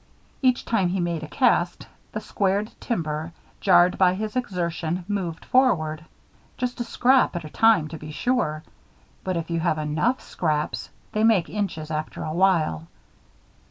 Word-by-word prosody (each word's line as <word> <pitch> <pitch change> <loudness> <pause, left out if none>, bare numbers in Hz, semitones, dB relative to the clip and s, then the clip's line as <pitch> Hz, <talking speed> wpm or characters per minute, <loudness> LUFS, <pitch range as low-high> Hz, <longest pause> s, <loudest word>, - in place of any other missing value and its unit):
Each 255 -2 +2
time 205 -6 +1
he 190 +2 -1
made 170 -2 -1
a 155 - -6
cast, 175 +3 +1 0.3
the 215 - -3
squared 200 +1 0
timber, 160 -6 -3 0.3
jarred 180 -1 +4
by 185 -1 +5
his 215 +3 -4
exertion, 175 -6 -2
moved 180 -6 -3
forward. 165 -12 +2 0.5
Just 250 0 -3
a - - +1
scrap 255 -2 +3
at 170 - -3
a 155 - -9
time, 225 -9 +4
to 160 - -7
be 150 - -9
sure; 155 -4 -1 0.6
but 185 -2 -1
if 165 0 -4
you 165 - 0
have 165 -2 +1
enough 155 - 0
scraps, 155 -3 -2 0.2
they 215 - 0
make 220 -6 +4
inches 175 -7 -3
after 155 0 -4
a 155 - -3
while. 165 - +2
175 Hz, 160 wpm, -24 LUFS, 155-215 Hz, 0.6 s, by